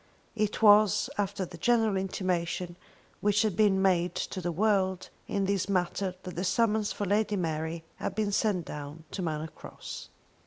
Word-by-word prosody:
It 215 0 -1
was 210 -1 +6
after 200 -1 -1
the 170 -1 -11
general 225 +1 +3
intimation 180 -2 -2 0.4
which 205 +1 +3
had 215 -5 0
been 205 -3 +4
made 180 -2 +2
to 185 - -3
the 175 0 -1
world 190 0 +1 0.2
in 200 -1 0
this 195 0 0
matter 185 0 0
that 180 - -7
the 175 - -2
summons 215 +1 +2
for 205 - -3
Lady 210 +2 +1
Mary 160 -2 -2
had 190 - -4
been 210 -1 0
sent 195 -5 +1
down 150 +2 -7
to 195 - -4
Manor 160 -2 -2
Cross. - - -9
190 Hz, 165 wpm, -29 LUFS, 175-205 Hz, 0.4 s, was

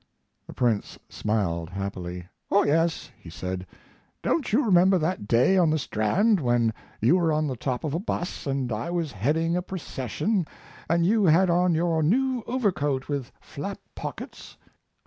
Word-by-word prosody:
The - - -9
Prince 115 -5 0
smiled 85 -6 -1
happily. 90 -2 -5 0.2
"Oh 200 - +4
yes," 165 +3 +1
he 85 - -12
said; 90 +2 -5 0.6
"don't 305 -9 0
you 255 +6 +3
remember 190 -1 +5
that 160 - -2
day 125 - +4
on 170 -3 +4
the 155 - +2
Strand 165 - +2
when 120 -4 +2 0.3
you 125 +12 +5
were 170 -3 +2
on 155 0 +1
the 135 -3 -2
top 125 +1 -3
of 150 -3 -2
a 165 - 0
bus 175 -5 -4
and 135 -3 -1
I 110 +8 -3
was 170 -4 -2
heading 155 - 0
a 180 - +1
procession 180 - -2 0.4
and 170 0 +3
you 210 +2 +3
had 175 +2 +5
on 175 0 +3
your 165 -1 +1
new 250 - +2
overcoat 155 - 0
with 140 -3 -3
flap 155 +7 -6 0.2
pockets?" - - -8
155 Hz, 165 wpm, -26 LUFS, 120-180 Hz, 0.6 s, remember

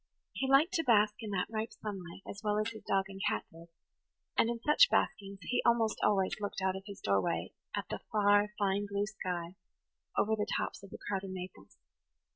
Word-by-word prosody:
He 265 - -1
liked 285 +6 +5
to 325 - +2
bask 215 -5 +5
in 220 - -5
that 190 -3 0
ripe 220 0 -3
sunlight 195 -3 -7
as 200 - -7
well 210 0 +1
as 215 +2 0
his 220 - -9
dog 195 -1 +2
and 195 0 -9
cat - - -2
did; 165 +1 -13 0.7
and 230 - +4
in 235 0 -2
such 400 - +6
baskings 195 0 0
he 245 +7 +1
almost 230 -2 +3
always 195 -2 +3
looked 205 -1 -3
out 190 0 +1
of 190 0 -7
his 200 -1 -8
doorway 100 -2 +1 0.2
at - - -3
the - - -3
far, 205 0 +4
fine 200 0 +1
blue 200 0 0
sky 180 -4 -4 0.6
over 220 +1 +3
the 210 -1 -2
tops - - -3
of 200 - -12
the - - -8
crowding 195 -1 -3
maples. 185 0 -9
205 Hz, 200 wpm, -33 LUFS, 190-220 Hz, 0.7 s, such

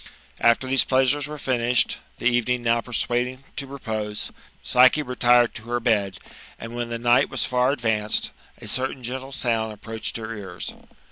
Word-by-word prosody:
After 115 +2 +3
these 130 0 +4
pleajsures 135 +2 +2
were 150 0 -7
finished, 125 -3 +1 0.2
the - - -8
evening 120 0 +2
now 115 0 +2
persuad 120 +1 0
ing 130 +1 -10
to 140 - -4
repose. 110 -6 -4 0.3
Psyche 130 +4 +5
retired 120 -2 +3
to 115 - -10
her 120 0 0
bed; 105 -5 +1 0.4
and, 115 +1 -8
when 120 -1 -3
the 115 - -3
night 120 +1 +3
was - - 0
far 125 0 +2
advanced, 110 -5 +1 0.3
a - - -9
certain 130 0 -1
gentle 130 +3 -5
sound 115 -4 0
approached 110 +2 -5
her 115 0 -6
ears. 95 -4 -7
120 Hz, 165 wpm, -24 LUFS, 115-130 Hz, 0.4 s, Psyche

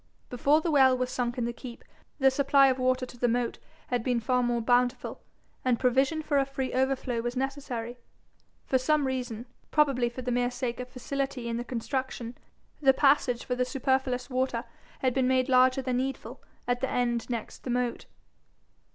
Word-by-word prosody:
Before 285 +5 +3
the 335 - -1
well 265 -3 +5
was 255 0 -2
sunk 245 -1 -2
in 240 - 0
the 240 - -2
keep, 240 0 -10 0.3
the 270 -2 +4
supply 275 0 +4
of 260 0 0
water 255 0 +1
to 245 -1 -14
the 245 - +2
moat 240 0 -1 0.3
had 245 -2 0
been 245 -1 +1
far 250 +2 +1
more 240 -1 +1
bountiful, 245 +2 +1 0.4
and 250 -2 +2
provision 270 +5 +2
for 290 -2 +2
a 275 - +2
free 270 -1 -3
overflow 260 -2 0
was 240 +1 -3
necessary. 255 -3 -4 0.7
For 260 - +2
some 295 +2 +2
reason, 250 -3 -3 0.2
probably 275 -5 +2
for 250 +2 -8
the 250 - -2
mere 245 0 +1
sake 245 -1 -4
of 250 0 -6
facility 265 -1 -3
in 230 0 -2
the 240 - -3
construction, 245 0 -4 0.5
the 270 -2 +6
passage 275 -4 +3
for 250 - -2
the 250 0 +1
superfluous 260 -1 0
water 255 -3 -1 0.4
had 255 -2 +2
been 260 -1 +2
made 260 0 +2
larger 255 +1 +4
than 255 -1 0
needful 265 +1 -4 0.3
at 245 0 0
the 265 - 0
end 240 -1 -1
next 235 -3 -5
the - - -5
moat. 245 -1 -1
255 Hz, 185 wpm, -28 LUFS, 245-265 Hz, 0.7 s, the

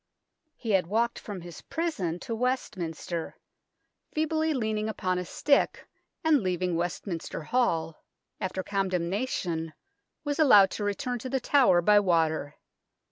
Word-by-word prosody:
He 225 - -4
had 190 -4 +3
walked 230 +4 0
from 200 -4 -7
his 175 -2 -10
prison 255 - -2
to 230 - -4
West 250 -1 -1
minster, 170 -1 -5 0.7
feebly 315 +1 0
leaning 220 -5 -1
upon 185 -4 -1
a 180 - -4
stick, 280 +9 +1 0.4
and, 310 -4 +4
leaving 180 -2 -1
Westminster 170 -1 -3
Hall 165 -6 0 0.4
after 185 0 -3
condemna 195 +4 -1
tion, 165 -6 -3 0.5
was 290 +1 -2
allowed 210 -11 +7
to 210 - -4
return 245 +5 -2
to 255 - -6
The 265 +1 0
Tower 245 -10 +4
by 210 +3 +6
water. 160 -6 +1
200 Hz, 135 wpm, -28 LUFS, 175-250 Hz, 0.7 s, allowed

